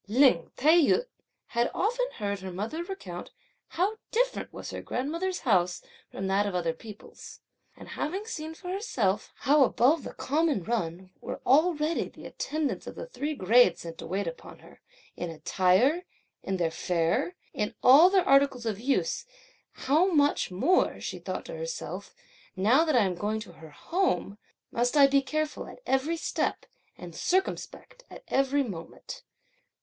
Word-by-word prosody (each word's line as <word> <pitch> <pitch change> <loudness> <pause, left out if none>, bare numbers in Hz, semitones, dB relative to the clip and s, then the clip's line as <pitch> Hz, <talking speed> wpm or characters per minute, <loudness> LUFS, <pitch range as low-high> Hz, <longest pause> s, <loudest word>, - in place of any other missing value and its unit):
Lin 240 -6 +4
Tai 310 +5 +5
yü 380 - +3 0.4
had 235 0 +1
often - - 0
heard 200 -2 -3
her 190 -1 -7
mother 220 - -4
recount 195 - -7 0.4
how 390 +6 -1
different - - 0
was - - -8
her - - -5
grandmother's 335 +8 -3
house 180 -7 +1 0.3
from 195 - -5
that 195 +2 +2
of 195 - -3
other 170 -2 0
people's; 210 +5 -12 0.4
and - - -12
having 380 +7 -3
seen 320 -7 -6
for 360 +2 -9
herself 240 - -1
how 290 +1 +5
above 270 +5 +3
the - - -8
common 295 - 0
run 185 -4 -3
were - - -6
already 310 +3 +2
the - - -14
attendants 305 -2 -3
of - - -7
the - - -6
three 310 -12 -4
grades, 240 +2 +4
(sent 165 -1 -8
to - - -7
wait 195 +2 -2
upon 165 -1 -8
her,) - - -18 0.3
in 175 - -4
attire, 185 - +2 0.4
in 195 -1 -2
their 170 -2 0
fare, 170 0 0 0.2
in 210 - -2
all 290 +8 +8
their 375 -2 +2
articles 275 -3 +4
of 215 -3 -2
use, 275 - 0 0.5
"how 310 +7 +2
much 290 -3 +2
more," 270 - +2
(she - - -5
thought - - -5
to - - -7
herself) - - -6 0.4
"now 225 +11 +4
that 310 -4 +1
I 235 - +5
am 190 -2 0
going 210 +4 -2
to 215 - -10
her 160 -1 -13
home, 270 - -1 0.3
must 245 +5 +1
I 280 - +9
be 275 0 +4
careful 305 +3 -3
at - - -11
every 280 +6 +1
step, - - -2 0.3
and 175 -1 -9
circumspect 385 +6 -2
at - - -12
every 275 +1 +2
moment! 180 -9 -8
265 Hz, 165 wpm, -28 LUFS, -, 0.5 s, I